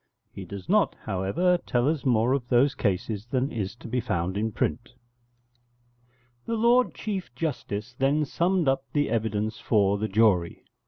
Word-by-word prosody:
He 95 - -8
does 95 0 -8
not, - - +3
however, 100 - +1
tell 120 -3 0
us 155 -2 -1
more 120 0 +3
of 130 -3 -2
those 135 +3 +4
cases 105 0 -2
than 130 +2 -1
is 100 -3 -4
to 120 - -11
be 125 +2 -1
found 90 -4 -2
in 110 +2 -1
print.] 120 +4 -3 1.5
The 230 - -1
Lord 240 +3 +3
Chief 195 -4 -4
Justice 120 -6 -4
then 145 +3 +2
summed 175 +3 0
up 135 0 +2
the 145 -1 +1
evidence 110 -1 -1
for 100 -2 +2
the 110 - -1
jury. 95 -5 +2
120 Hz, 160 wpm, -26 LUFS, 105-140 Hz, 1.5 s, those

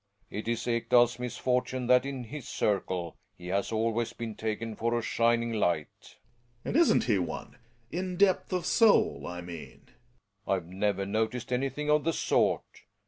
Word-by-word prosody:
It 105 +2 -5
is 115 0 -1
EkdaFs 120 0 +3
misfortune 125 +1 -1
that 125 +2 +4
in 135 -2 -4
his 130 +3 -8
circle 95 -4 -1 0.2
he 90 0 -8
has 100 +3 0
always 115 +1 0
been 115 -2 -5
taken 110 +1 -3
for 115 +2 0
a - - 0
shining 115 0 +1
light 85 -8 -2 0.5
Gregers. - - -34
And - - -2
isn't 335 +2 +5
he 105 -5 +2
one? 90 +6 -5 0.3
In 180 +1 -3
depth 195 -1 +3
of 180 -2 -1
soul 225 +1 +3
I 90 0 -5
mean. 85 -2 -9
f 125 - -25
Relling. - - -32 0.6
I've 90 -3 -4
never 100 +1 -1
noticed 110 +5 -1
anything 135 +4 -1
of 150 0 +3
the 165 - +1
sort. - - 0
115 Hz, 170 wpm, -29 LUFS, 105-125 Hz, 0.6 s, isn't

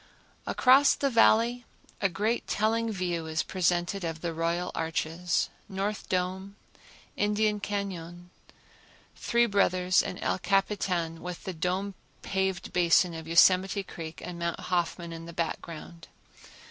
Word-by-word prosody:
Across 265 +3 +5
the 275 -1 0
Valley 230 +1 +4 0.4
a 195 - +3
great 210 +6 -1
telling 225 +2 +1
view 175 -4 -2
is 160 0 -1
presented 180 +1 0
of 165 -1 -4
the 170 -1 -2
Royal 170 +2 -1
Arches, 165 +2 -1 0.2
North 200 +1 -3
Dome, 190 +2 -2 0.6
Indian 210 0 +1
Cañon, 180 -4 -5 0.9
Three 235 0 +2
Brothers 185 -4 +3
and 180 - -5
El - - 0
Capitan, 185 -4 0
with 180 0 -6
the 190 - -4
dome 185 +4 -2 0.3
paved 190 -2 -2
basin 175 0 +4
of 160 -1 -7
Yosemite 185 +4 +4
Creek 160 -3 -8
and 175 -1 -7
Mount 170 0 -2
Hoffman 175 -1 -2
in 165 0 -8
the 170 - -9
background. 165 0 -5
180 Hz, 130 wpm, -28 LUFS, 170-200 Hz, 0.9 s, Across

